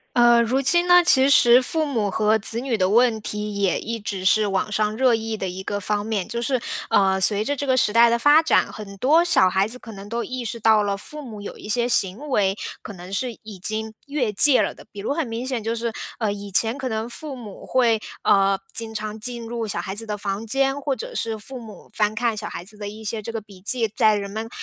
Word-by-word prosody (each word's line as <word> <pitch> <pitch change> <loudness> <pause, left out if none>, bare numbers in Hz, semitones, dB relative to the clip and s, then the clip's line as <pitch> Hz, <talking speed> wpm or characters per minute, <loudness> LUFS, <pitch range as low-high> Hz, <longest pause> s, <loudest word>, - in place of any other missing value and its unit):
呃， 240 -1 +6
如 240 +3 +1
今 345 +6 +3
呢， 355 0 +7
其 270 -5 +5
实 245 -3 +6
父 315 +5 -1
母 230 -8 -1
和 215 +2 +2
子 220 +2 -2
女 250 -1 -1
的 185 -3 +1
问 230 0 +3
题 210 0 -4
也 190 -3 +2
一 230 +1 -5
直 195 -3 -4
是 210 +2 +4
网 195 +1 -1
上 215 0 0
热 255 -1 +4
议 225 -1 -2
的 190 - -3
一 185 +1 -6
个 205 +1 -3
方 205 +1 -1
面。 210 -4 -2
就 235 +1 -4
是， 255 +1 0 0.3
呃， 190 -1 +3
随 205 +2 +3
着 285 - -1
这 285 +1 -4
个 260 -1 +2
时 215 -4 +2
代 235 +1 +6
的 235 - +2
发 290 +6 +6
展， 320 - +2
很 200 -2 -9
多 300 - +4
小 340 - +4
孩 190 +2 +1
子 240 +3 -7
可 235 - -11
能 200 0 -10
都 235 +1 -2
意 255 -1 -5
识 230 +1 -5
到 220 0 +4
了， 200 -1 -1
父 300 +9 -8
母 225 -7 -9
有 200 - -7
一 210 - -9
些 240 +2 +1
行 225 +4 -1
为， 200 -6 +1 0.2
可 - - -8
能 180 +1 -10
是 240 +2 -2
已 210 -4 -10
经 220 +3 -4
越 270 -7 -1
界 260 +6 +5
了 - - -2
的。 - - -15
比 205 - -10
如 215 +7 -2
很 300 -4 -2
明 230 +2 -4
显 255 -4 -3
就 225 +2 -1
是， 230 -1 -3 0.2
呃， 215 -3 -1
以 205 0 -8
前 225 +5 +2
可 265 -2 -4
能 220 0 -3
父 280 +3 -7
母 220 -6 -10
会， 235 -4 +2 0.2
呃， 195 -1 +3
经 225 -1 -3
常 215 0 -4
进 235 +1 -4
入 230 -1 -4
小 205 - -2
孩 190 - -4
子 225 +3 -3
的 210 -1 -3
房 200 +1 -4
间， 270 +3 0
或 275 -1 -1
者 - - -7
是 225 - -2
父 250 +5 -9
母 220 -3 -12
翻 210 0 0
看 230 0 0
小 210 - -5
孩 175 - -7
子 210 +3 -12
的 205 -1 -5
一 215 +2 -10
些 215 +1 -3
这 220 - -6
个 225 - -3
笔 200 -3 -16
记， 230 +3 +1
在 215 -1 +4
人 200 -1 -4
们 220 +2 -5
220 Hz, 275 characters per minute, -23 LUFS, 205-250 Hz, 0.3 s, 呢